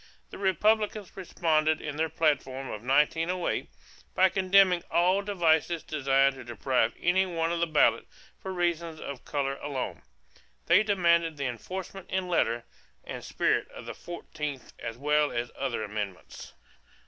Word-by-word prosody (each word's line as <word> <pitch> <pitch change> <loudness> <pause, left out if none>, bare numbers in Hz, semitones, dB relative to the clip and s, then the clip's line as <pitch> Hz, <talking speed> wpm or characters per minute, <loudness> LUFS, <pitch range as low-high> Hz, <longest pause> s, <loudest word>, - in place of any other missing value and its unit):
The - - -9
Republicans 210 +1 +1
responded 155 -4 +1
in 150 -1 -5
their 160 +1 0
platform 140 -4 0
of 105 - -6
1908 160 +7 +1 0.5
by 190 0 +5
condemning 190 -1 +4
all 180 +3 +3
devices 170 -4 +1
designed 135 -2 +2
to 135 - -10
deprive 120 0 0
any 190 +2 +2
one 165 -2 -1
of 170 - -1
the 170 - +1
ballot 155 -2 +3 0.3
for 190 - -6
reasons 170 -3 -1
of 140 -3 -7
color 140 -2 -2
alone; 140 -3 -4 0.6
they 175 +5 +6
demanded 170 -6 +2
the 140 - -2
enforcement 185 - -6
in 185 -1 -1
letter 120 -9 +1 0.4
and - - -7
spirit - - 0
of - - -11
the - - -5
fourteenth 150 -6 -7
as 115 - -6
well 150 +2 +2
as 120 +1 -3
all 135 - -5
other 120 -4 -2
amendments. 105 -3 -6
160 Hz, 150 wpm, -28 LUFS, 135-180 Hz, 0.6 s, they